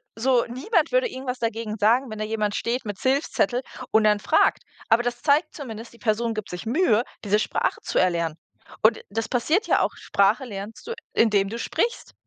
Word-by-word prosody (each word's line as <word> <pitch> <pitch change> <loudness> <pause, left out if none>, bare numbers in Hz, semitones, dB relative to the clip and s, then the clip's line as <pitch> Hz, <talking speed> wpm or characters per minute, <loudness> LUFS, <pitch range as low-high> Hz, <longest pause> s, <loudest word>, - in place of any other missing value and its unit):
so 245 +1 +2
niemand 315 - 0
würde - - +3
irgendwas 260 -5 -5
dagegen 225 -2 -2
sagen, 235 +5 +3
wenn 215 -1 -7
da 215 - -1
jemand 215 -1 -1
steht 245 +2 -2
mit 205 -2 -5
Hilfszettel 260 -3 +1 0.3
und 220 - +4
dann 210 -1 +4
fragt. 315 +9 +3 0.3
Aber 225 +2 +5
das 245 0 -3
zeigt 295 +2 +2
zumindest, 230 -6 -8
die - - -16
Person 230 +1 0
gibt 215 - -5
sich 180 +4 -6
Mühe, 240 - +3 0.2
diese 210 0 +2
Sprache - - -1
zu - - -3
erlernen. 170 -3 +1 0.5
Und 220 - +4
das 225 +2 -2
passiert 310 - +1
ja - - +3
auch. - - -1
Sprache 205 +7 +1
lernst 205 - -8
du, 470 - -3 0.2
indem 205 -3 +3
du 230 - -5
sprichst. 470 - -2
230 Hz, 190 wpm, -24 LUFS, 210-260 Hz, 0.5 s, Aber